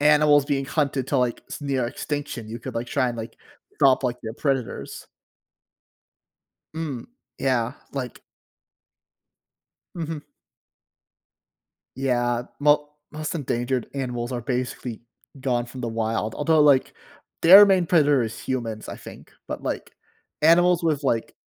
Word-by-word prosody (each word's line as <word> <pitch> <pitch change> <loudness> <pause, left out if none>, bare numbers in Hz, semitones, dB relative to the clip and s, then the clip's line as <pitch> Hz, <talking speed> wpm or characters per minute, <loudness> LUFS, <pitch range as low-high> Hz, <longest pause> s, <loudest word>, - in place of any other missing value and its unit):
animals 150 -1 +5
being 140 -2 -1
hunted 135 -2 -1
to, 140 - +1
like, 125 -1 0
s - - -7
near 135 -4 -1
extinction, 140 -4 -5
you 115 +2 -6
could, - - -7
like, 115 +1 -3
try 130 -3 +1
and, 120 - -4
like, 115 0 -7 0.4
drop, 135 0 +5
like, 125 -1 -1
their 110 - -4
predators. 135 -4 -3 1.7
Mm, 150 -7 -4 0.3
yeah, 125 -2 +1 0.2
like 130 -4 -5 1.8
Mhm. 160 -2 -5 1.7
Yeah, 120 -2 0 0.2
mo 150 0 +3 0.2
most 155 +1 -4
endangered 125 -4 -1
animals 125 -2 -3
are 120 - -2
basically 125 -2 -3 0.4
gone 120 -2 0
from 125 +1 -9
the 120 - -2
wild, 110 -1 -2
although, 155 +1 +2
like, 140 -3 +4 0.5
their 195 +5 +11
main 190 -4 +3
predator 145 -6 +4
is 115 0 -4
humans, 115 -4 -4
I - - -6
think, - - -12 0.2
but, - - -5
like, - - -4 0.5
animals 175 +2 +5
with, 155 -4 +1
like 115 -4 0
135 Hz, 130 wpm, -24 LUFS, 120-150 Hz, 1.8 s, their